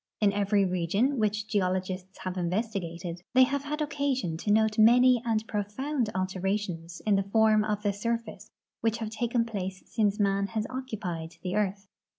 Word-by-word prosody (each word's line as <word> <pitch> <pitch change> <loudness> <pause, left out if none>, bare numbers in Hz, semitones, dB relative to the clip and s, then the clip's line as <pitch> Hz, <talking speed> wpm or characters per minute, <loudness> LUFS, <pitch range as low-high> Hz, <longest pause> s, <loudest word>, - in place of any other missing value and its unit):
In 205 -2 +3
every 200 0 +2
region 195 - +1
which 210 0 0
geologists 185 -2 -1
have 185 -1 -3
investigated 175 -2 -3
they 260 - +8
have 280 +2 0
had 300 +1 -2
occasion 275 - -1
to 205 - -4
note 220 0 +3
many 245 +2 +6
and 220 -2 0
profound 225 +5 -2
alterations 185 -2 -2
in 205 -2 +4
the 195 0 -2
form 220 -1 +4
of 210 -1 -2
the 205 -1 +1
surface 215 -1 -4 0.3
which 225 0 0
have 220 -2 -4
taken 235 +1 0
place 190 -4 -5
since 210 -2 0
man 200 -1 +2
has 215 0 -2
occupied 195 -11 -5
the 185 +1 -2
earth. 200 -1 -1
210 Hz, 165 wpm, -28 LUFS, 190-230 Hz, 0.3 s, they